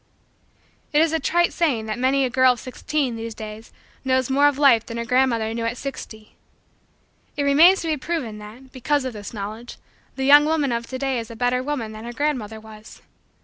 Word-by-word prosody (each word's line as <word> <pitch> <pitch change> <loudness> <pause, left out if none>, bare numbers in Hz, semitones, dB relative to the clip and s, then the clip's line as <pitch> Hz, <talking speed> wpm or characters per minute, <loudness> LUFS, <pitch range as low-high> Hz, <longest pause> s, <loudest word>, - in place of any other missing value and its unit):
It 295 - +4
is 320 0 +2
a 320 - +1
trite 345 +2 +1
saying 275 -10 0
that 220 +2 -4
many 265 +1 +2
a - - -1
girl 255 0 +4
of 245 - -11
sixteen, 260 +1 -3
these 225 0 -6
days, 215 +1 -9 0.3
knows 260 -1 0
more 285 +2 +4
of 290 -2 0
life 270 -6 +5
than 230 - -7
her 235 - -3
grandmother 235 -3 +1
knew 230 0 -3
at 235 +2 -2
sixty. 220 -6 -8 1.0
It 285 - 0
remains 320 +7 +5
to 330 - -4
be 310 -1 0
proven 260 -9 -4
that, 230 +6 -13
because 285 +2 -1
of 255 - -4
this 205 -2 -8
knowledge, 215 +3 -7 0.4
the 265 - -2
young 290 +2 +7
woman 305 -4 0
of 235 0 -3
to 260 - -5
day 265 -2 -1
is 225 - -7
a 230 - -9
better 245 +2 0
woman 255 -5 -4
than 215 +1 -9
her 240 - -6
grandmother 240 -6 -2
was. 215 0 -14
255 Hz, 210 wpm, -22 LUFS, 225-285 Hz, 1.0 s, young